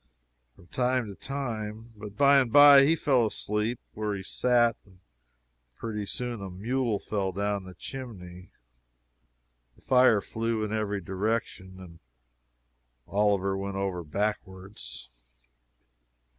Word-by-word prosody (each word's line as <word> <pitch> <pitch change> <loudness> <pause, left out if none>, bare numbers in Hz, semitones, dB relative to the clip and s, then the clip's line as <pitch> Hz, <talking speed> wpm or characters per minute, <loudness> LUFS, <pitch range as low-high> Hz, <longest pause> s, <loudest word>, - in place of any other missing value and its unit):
from - - -19
time 125 -1 0
to 100 - -8
time. 115 -5 -5
But 105 -1 -10
by 140 0 +6
and 125 -4 0
by 145 +1 +9
he 160 +3 +3
fell 130 -7 +2
asleep 105 +3 -2
where 105 -1 -2
he 95 - -6
sat, 120 +2 +2
and 95 -3 -22 0.8
pretty 105 -3 -5
soon 120 0 -4
a 95 - -6
mule 115 +4 -1
fell 100 -1 -2
down 100 +1 -2
the 95 -1 -11
chimney! 95 -8 -9 1.3
The - - -25
fire 125 -4 +5
flew 115 +1 -2
in 105 0 -3
every 105 -2 -2
direction, 95 0 -3
and 85 -3 -13 1.1
Oliver 100 -1 +1
went 100 0 -4
over 95 -3 -2
backwards. 95 - -5
105 Hz, 125 wpm, -28 LUFS, 95-120 Hz, 1.3 s, by